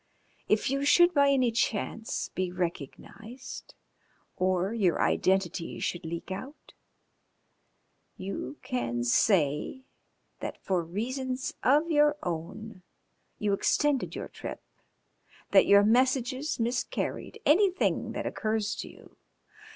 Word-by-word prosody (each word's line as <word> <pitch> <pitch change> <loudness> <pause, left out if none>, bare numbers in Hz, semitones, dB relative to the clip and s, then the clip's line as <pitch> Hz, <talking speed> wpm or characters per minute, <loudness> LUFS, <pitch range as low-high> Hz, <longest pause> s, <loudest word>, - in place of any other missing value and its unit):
If 215 +4 +2
you 275 +1 0
should 345 +5 +5
by 280 -2 +4
any 260 -4 +3
chance 225 0 -2
be 185 -1 -2
recognised 180 - -6 0.6
or 185 +2 0
your 195 -7 +1
identity 185 -2 0
should 175 - -3
leak 170 +3 -6
out, 260 +10 -8 1.4
you 185 -8 -5
can 120 -1 -2
say 150 - +2 0.6
that - - -5
for 185 -3 -1
reasons 255 +9 -3
of 300 +6 +3
your 295 -1 +4
own 185 +5 -5 0.6
you 205 -1 0
extended 280 +7 +1
your - - -5
trip, - - -8 0.9
that - - +6
your 200 0 +7
messages 255 +5 +1
miscarried, 240 +2 -2
anything 375 +4 +2
that - - -4
occurs 215 -2 -1
to - - -6
you. - - -17
220 Hz, 110 wpm, -28 LUFS, 185-265 Hz, 1.4 s, your